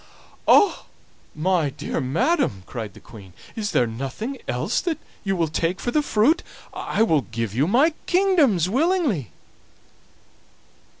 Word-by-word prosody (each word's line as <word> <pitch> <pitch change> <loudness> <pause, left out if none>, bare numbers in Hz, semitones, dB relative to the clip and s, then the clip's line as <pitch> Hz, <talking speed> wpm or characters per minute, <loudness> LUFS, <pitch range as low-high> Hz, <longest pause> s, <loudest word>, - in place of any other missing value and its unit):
"'Ah! 410 - +5 0.5
my 165 -1 +1
dear 145 +3 -4
madam,' 130 - 0
cried 110 -5 -7
the - - -12
Queen, 95 -5 -14 0.2
'is 215 -2 -2
there 125 - +2
nothing 135 - -5
else - - -1
that 335 -4 -2 0.3
you 195 -1 0
will 170 -2 +1
take 165 +4 -1
for 240 - -2
the 300 - +2
fruit? 285 +5 +2 0.3
I - - 0
will 160 -10 +3
give 115 -3 -4
you 135 +7 +1
my 275 - +3
kingdoms 330 - +3
willingly. 265 - +1
185 Hz, 135 wpm, -23 LUFS, -, 0.5 s, Ah